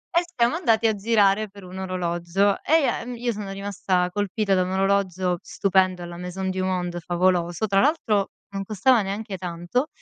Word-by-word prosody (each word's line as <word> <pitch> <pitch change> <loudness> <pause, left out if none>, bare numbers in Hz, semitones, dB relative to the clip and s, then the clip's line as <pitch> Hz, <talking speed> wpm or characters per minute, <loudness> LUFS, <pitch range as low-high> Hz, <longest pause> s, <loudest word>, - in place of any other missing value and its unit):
E 340 - +6 0.2
siamo 235 +5 +3
andati 230 -10 +2
a 220 - +2
girare 205 -1 +2
per 200 -1 -14
un 185 +1 -8
orologio 185 +1 0
e 320 +1 +4
ia - - 0
uhm, 245 0 -6
io 240 0 -1
sono 205 -2 -6
rimasta 195 -2 -1
colpita 205 +1 0
da 185 - +3
un 185 - -4
orologio 190 -2 +1
stupendo 185 -2 +1
alla 175 0 -7
Maison 180 +2 -4
du 185 0 -2
Monde, 180 -2 -2
favoloso. 175 +2 +1
Tra 195 0 +3
l'altro 225 -10 +1 0.2
non 195 0 -3
costava 220 +4 +3
neanche 200 +1 -4
tanto. 175 - -2
195 Hz, 180 wpm, -24 LUFS, 180-215 Hz, 0.2 s, E